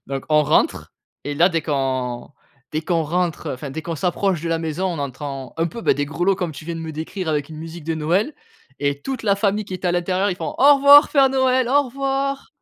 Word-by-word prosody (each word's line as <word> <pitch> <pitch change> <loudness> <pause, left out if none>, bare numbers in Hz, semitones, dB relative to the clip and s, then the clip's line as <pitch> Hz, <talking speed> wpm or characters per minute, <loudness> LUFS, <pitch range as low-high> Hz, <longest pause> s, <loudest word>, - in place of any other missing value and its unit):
Donc, 135 -1 -4
on 150 0 +4
rentre 150 +2 +1 0.3
et 145 - -3
là, 175 +5 +5
dès 165 -2 0
qu'on 130 -4 -2 0.4
dès 155 - -1
qu'on 165 -1 0
rentre, 170 +1 -2
enfin 135 +2 -6
dès 160 +3 -5
qu'on 165 0 -4
s'approche 180 +1 0
de 170 - -3
la 165 - 0
maison, 165 +3 -2
on 175 -4 -3
entend 135 -1 -5
un 165 - +1
peu, 170 +8 -7
bah, - - +4
des 145 0 -2
grelots 175 +6 +1
comme 180 -4 -3
tu 145 +2 -10
viens 170 +1 -4
de - - -6
me 160 -1 -6
décrire 160 +3 -5
avec 150 -2 -1
une 155 - -9
musique 165 0 -8
de 165 - -1
Noël 175 - 0 0.5
et 140 0 -1
toute 265 -3 -4
la 200 -3 +2
famille 205 +1 0
qui 190 - -7
est 185 - -8
à 175 - +2
l'intérieur, 185 +3 0
ils 180 - -3
font: - - -5
«Au 285 +1 +7
revoir 285 +2 +8
Père 275 -2 +5
Noël, 260 -2 +2
au 285 +2 +4
revoir!» 275 +1 -2
170 Hz, 245 wpm, -21 LUFS, 150-205 Hz, 0.5 s, revoir